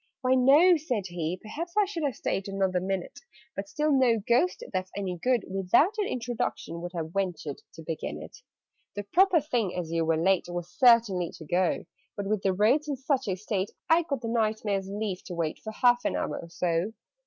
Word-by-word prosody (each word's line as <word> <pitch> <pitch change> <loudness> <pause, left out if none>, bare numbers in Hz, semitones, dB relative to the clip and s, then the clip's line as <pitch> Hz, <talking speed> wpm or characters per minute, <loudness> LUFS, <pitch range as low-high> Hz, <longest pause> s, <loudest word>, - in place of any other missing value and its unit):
"Why, 255 -1 +3
no," 290 +8 +6
said 250 - -2
he; 175 0 -3
"perhaps 330 - -7
I 420 - +5
should 370 -4 -5
Have 285 -4 -1
stayed 195 - -2
another 190 -2 0
minute 190 0 -4 0.4
But 200 0 -5
still 300 0 0
no 255 -4 +4
Ghost, 250 - +1
that's 185 0 -2
any 185 -3 -3
good, 250 +1 +1
Without 195 - +3
an 410 - +1
introduction 235 -8 -3
would 175 +1 -6
Have 165 -1 -4
ventured 180 -7 -3
to 160 - -10
begin 155 - -4
it. 80 +1 -10 0.6
"The 205 - -3
proper 360 - +4
thing, 245 - -1
as 175 -3 -4
you 165 0 +1
were 160 0 +1
late, 185 +3 +2
Was 175 0 -5
certainly 225 -9 +4
to 160 - -11
go: 180 +3 0 0.3
But, 200 - -3
with 210 0 0
the 195 - +2
roads 230 +11 +2
in 290 - -1
such 265 -1 -1
a 190 - 0
state, 195 0 -2 0.2
I 330 +1 +6
got 285 -7 -3
the 230 - -4
Knight 220 -2 0
Mayor's 195 -2 -1
leave 200 -2 -3
to 180 - -6
wait 165 -2 -2
For 220 - -5
half 245 +2 +3
an - - 0
hour - - -2
or 170 - -9
so." 175 +4 -1
200 Hz, 210 wpm, -28 LUFS, 180-255 Hz, 0.6 s, no